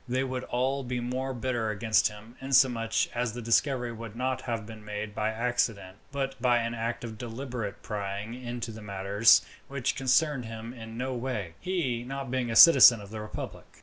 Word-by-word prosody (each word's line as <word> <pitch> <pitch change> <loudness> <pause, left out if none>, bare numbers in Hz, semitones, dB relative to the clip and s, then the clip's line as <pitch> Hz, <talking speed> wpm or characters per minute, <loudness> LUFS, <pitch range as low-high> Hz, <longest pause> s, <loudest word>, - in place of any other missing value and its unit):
They 130 +2 +1
would 130 -1 -3
be - - -10
all 135 +3 0
the 125 0 -3
more 130 +2 -3
bitter 120 -3 -2
against 110 +1 +2
him, 105 +3 -11
inasmuch 130 -5 +2
as 120 -2 -1
the 120 - -6
discovery 120 +1 +1
would 115 -1 -8
not 130 +1 -1
have 115 -3 -3
been 110 -1 -11
made 105 0 -5
by 105 +1 -1
accident, 110 -4 -1
but 135 -3 -3
by 120 -1 +4
an 115 0 -1
act 115 +1 -3
of 110 -2 -7
deliberate 120 -3 -5
prying 100 +1 -4
into 120 -1 -5
matters 100 +1 +4 0.2
which 140 -2 -2
concerned 135 0 +2
him 115 +1 -7
in 115 -2 -9
no 130 +1 -2
way, 120 -9 -4
he 160 -11 -1
not 135 0 -5
being 130 -2 -1
a 115 - -2
citizen 130 -6 +9
of 100 0 -11
the 110 -1 -5
republic. 105 - -8
120 Hz, 185 wpm, -28 LUFS, 110-130 Hz, 0.2 s, citizen